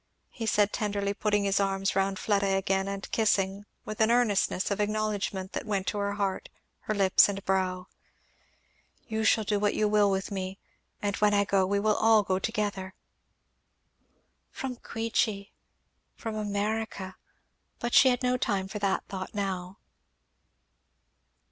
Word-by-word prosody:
he 225 -2 -5
said 205 -1 +2
tenderly, 200 -2 -1
putting 205 0 0
his 200 0 +1
arms 195 -1 0
round 195 0 +1
Fleda 200 -2 +1
again 195 0 0
and 195 0 -5
kissing, 200 -2 +1 0.2
with 215 +1 -4
an 220 - +4
earnestness 215 -5 +2
of 200 - -1
acknowledgment 205 -3 -2
that - - -3
went 200 -3 -1
to 205 - -2
her 200 0 -1
heart, 200 -2 -2 0.3
her 215 - -3
lips 195 0 +5
and 200 -1 -5
brow, 185 -1 0 1.2
"you 220 0 -2
shall 220 0 +4
do 205 0 0
what 205 0 +1
you 215 - +2
will 210 -1 +4
with 195 +1 -2
me; 190 -1 -4 0.5
and 200 -1 -1
when 210 -1 +3
I 200 0 +3
go, 195 -1 +2
we 200 +1 +1
will 215 +1 +2
all 220 -1 +5
go 190 -1 0
together." 200 -3 -3 1.5
From 260 -2 -5
Queechy! 225 -3 -2 0.6
From 225 -1 -5
America! 210 -2 -3 0.6
But 240 -1 -4
she 265 - +7
had 250 +1 0
no 250 0 +2
time 200 -6 -1
for 210 +2 -6
that 200 -1 0
thought 190 +1 -6
now. 190 -2 -3
200 Hz, 155 wpm, -28 LUFS, 195-215 Hz, 1.5 s, she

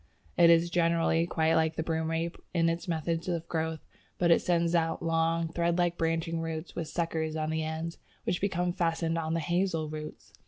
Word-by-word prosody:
It 170 -1 +6
is, 170 +1 +5
generally, 165 -1 +2
quite 160 -1 +1
like 160 0 +2
the 160 - -1
Broomrape 165 +1 -1 0.2
in 165 -1 +3
its 170 +3 -3
method 165 +1 -1
of 170 -2 -2
growth, 160 -1 -2 0.3
but 170 -1 +3
it - - +5
sends 170 -1 +1
out 165 -1 +1
long 165 0 +1
thread 170 0 +1
like 175 -1 +2
branching 165 0 -1
roots 160 0 -5
with 165 -2 -3
suckers 160 -1 -2
on 155 0 -1
the 160 0 -1
ends, 160 +1 -4 0.2
which 175 - -1
become 180 -3 0
fastened 165 -1 0
on 160 0 -1
the - - +1
Hazel 170 -1 0
roots. 155 0 -8
165 Hz, 190 wpm, -29 LUFS, 160-170 Hz, 0.3 s, It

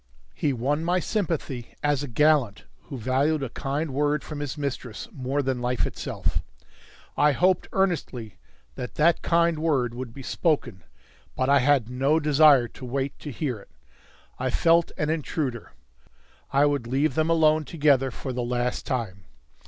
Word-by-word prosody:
He 145 - 0
won 140 +5 -1
my 175 +2 +1
sympathy 165 - -3
as 145 -2 +1
a 145 - -4
gallant 140 -4 +2 0.2
who 135 - -7
valued 135 +5 +1
a 135 - -3
kind 140 +3 -3
word 145 +1 +1
from 150 -2 -7
his 145 0 -4
mistress 140 - -4
more 140 - -2
than 130 -2 -1
life 125 0 0
itself. - - -3 0.7
I 150 0 +4
hoped 180 +5 +2
earnestly 135 - -2 0.3
that 125 - -7
that 165 +2 +3
kind 170 -1 +2
word 135 -7 +1
would 125 -1 -6
be 135 +3 -10
spoken. 125 - -1 0.5
But 130 +1 0
I 140 0 +6
had 135 -3 +3
no 135 +5 +2
desire 145 -4 +5
to 130 - -14
wait 135 +2 -3
to 150 - -7
hear 130 -3 -3
it. - - -17 0.7
I 130 +1 0
felt 165 +6 +3
an 150 0 0
intruder. 140 -6 -3 0.8
I 140 +1 +4
would 140 -5 0
leave 135 +3 +1
them 155 +3 +1
alone 155 -1 +4
together 145 -4 +2
for 130 +1 -6
the 125 - -2
last 120 0 -2
time. 105 -8 -3
140 Hz, 160 wpm, -25 LUFS, 125-155 Hz, 0.8 s, I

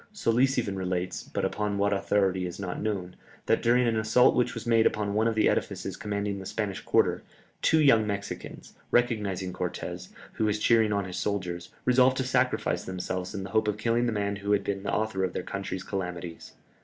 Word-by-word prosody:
Solis 130 - +2
even 100 -5 -1
relates, 90 -1 -2
but - - -3
upon 105 -1 -1
what 100 0 +2
authority 95 -2 +1
is 90 - -8
not 90 -3 -4
known, 95 -4 -3 0.3
that - - +2
during 120 +1 +3
an 115 -1 +1
assault 110 +3 +4
which 125 - +1
was 115 - -6
made 115 -1 +4
upon 105 -1 -1
one 110 +2 +2
of 115 - 0
the 110 - +4
edifices - - -1
commanding 100 -1 -3
the 95 - -7
Spanish 105 -3 -3
quarter, - - +2 0.4
two 160 - +4
young 115 -8 +5
Mexicans, 100 -1 -6 0.2
recognizing 105 -6 0
Cortès, 90 0 -5 0.2
who 110 - 0
was 105 -1 +1
cheering 110 0 +3
on 100 -1 0
his 90 -1 -6
soldiers, 90 -4 -3 0.2
resolved 125 +1 +4
to 130 - +1
sacrifice 130 0 +1
themselves 95 +1 -4
in 95 - -3
the 95 - -7
hope 110 -1 +2
of 105 -1 0
killing 115 +2 +1
the - - +1
man 100 -1 -1
who 100 +1 0
had 100 -1 +2
been 100 -1 -2
the 100 - -3
author 105 -3 0
of 90 -1 -1
their - - -3
country's 95 -1 -4
calamities. 90 -3 -5
100 Hz, 205 wpm, -28 LUFS, 95-115 Hz, 0.4 s, young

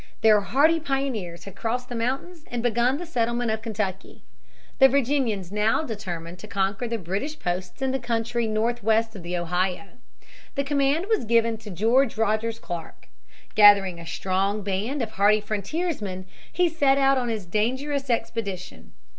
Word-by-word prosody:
Their 215 -2 +6
hardy 300 +10 +3
pioneers 265 - -3
had 195 - -10
crossed 245 +2 -2
the 245 - -7
mountains 270 +9 -3
and 240 -1 -3
begun 240 +3 +2
the 350 - -6
settlement 235 -5 0
of 220 0 -2
Kentucky. 210 -4 -4 0.6
The 270 -1 +8
Virginians 250 -8 0
now 210 +7 +2
determined 180 - -6
to 215 - -10
conquer 200 +4 -1
the 230 0 -2
British 205 - -4
posts 180 +6 -4
in 265 - +1
the 265 - -1
country 235 -1 -1
northwest 225 0 +1
of 195 - -7
the 175 +1 -3
Ohio. 180 +3 -1 0.7
The 280 - +1
command 285 +4 +1
was 440 - +1
given 230 0 +2
to 215 -1 -10
George 225 +7 +2
Rogers 225 +1 0
Clark. 175 -6 -8 0.4
Gathering 200 -4 +6
a 170 - -9
strong 195 +4 -1
band 210 +8 -2
of 220 - -5
hardy 210 +1 +4
frontiersmen 210 - -3 0.3
he 360 -1 +2
set 285 -5 +3
out 270 -1 +4
on 245 -1 -2
his 220 -4 -3
dangerous 260 +9 -1
expedition. 225 -5 -3
225 Hz, 160 wpm, -25 LUFS, 200-265 Hz, 0.7 s, The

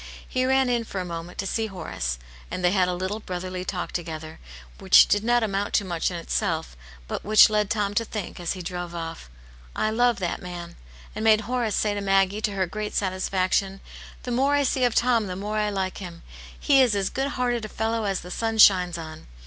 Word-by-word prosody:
He 255 0 0
ran 265 0 +3
in 240 -1 +1
for 200 -3 -5
a 180 - -3
moment 170 0 -7
to 195 - -2
see 220 +3 -1
Horace, 160 - -4 0.3
and 180 - -3
they 175 - +4
had 185 -2 +3
a 180 - -1
little 190 +4 -3
^brotl^rly 185 -1 -5
talk 185 -1 -4
together, 160 -2 -6 0.4
which - - +7
did 205 +1 +2
not 240 0 +3
amount 200 -1 -1
to 200 - +2
much 170 -3 -1
in 175 - -5
itself, 60 - -2 0.3
but - - -4
which 215 +1 +7
led 210 -1 +1
Tom 205 -2 0
to 230 - +1
think, 215 -5 -6
as 175 - -2
he 185 -2 -7
drove 175 0 -5
off, 165 - -6 0.2
" - - -22
I 215 - 0
do 220 - -4
love 245 -2 +3
that 180 -3 -3
man! 175 -2 -8 0.2
" 65 - -20
And 215 - -3
made 220 -1 +5
Horace 240 -2 -1
say 210 -1 +1
to 205 - -3
Maggie, 195 +1 +2
to 210 -2 -1
her 190 -1 0
great 210 +4 -5
satisfaction: 190 0 0 0.2
" - - -16
The 250 - -4
more 270 +4 +2
I 285 - +3
see 260 -1 +1
of 240 - 0
Tom, 235 -3 +3
the 180 - -4
more 210 +3 -3
I 210 0 +1
like 190 -2 -3
him. 175 -3 -9 0.4
He 275 -2 +5
is 240 -5 +3
as 195 -1 -1
good 270 +1 -1
hearted 245 -2 0
a 215 - -5
fellow 225 +1 -1
as 195 -2 -1
the 180 - -10
sun 225 +3 -2
shines 180 -5 +6
on." 160 -1 -9
195 Hz, 235 wpm, -25 LUFS, 180-220 Hz, 0.4 s, which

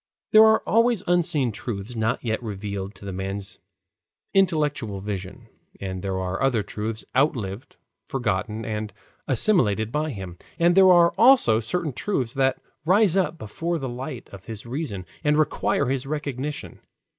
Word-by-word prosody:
There 215 0 +9
are 220 0 +4
always 230 -2 +3
unseen 160 -8 +1
truths 110 0 -6
not 110 0 -1
yet 110 0 -1
revealed 100 -2 -5
to - - -13
the 100 - -5
man's 95 +1 -4 0.7
intellectual 150 - +1
vision, 95 -1 -6 0.3
and 95 -1 -5
there 95 -1 -2
are 95 +1 -3
other 125 -6 +2
truths 110 +2 -5
outlived, 125 -4 0 0.3
forgotten, 110 -3 -2
and 105 -1 -3 0.4
assimilated 115 - +3
by 155 +3 -1
him, 95 - -7 0.2
and 170 +1 +4
there 190 0 +7
are 170 -1 +5
also 230 - +6
certain 155 +6 -2
truths 130 - -2
that 135 -1 +1 0.2
rise 190 +2 +4
up 185 -3 +1
before 165 +8 -3
the 135 -4 -4
light 125 +1 -6
of 95 -2 -12
his 110 -1 -7
reason 120 - -4 0.2
and 150 0 +3
require 150 -2 +1
his 135 0 -1
recognition. 145 -1 -4
125 Hz, 150 wpm, -24 LUFS, 105-155 Hz, 0.7 s, There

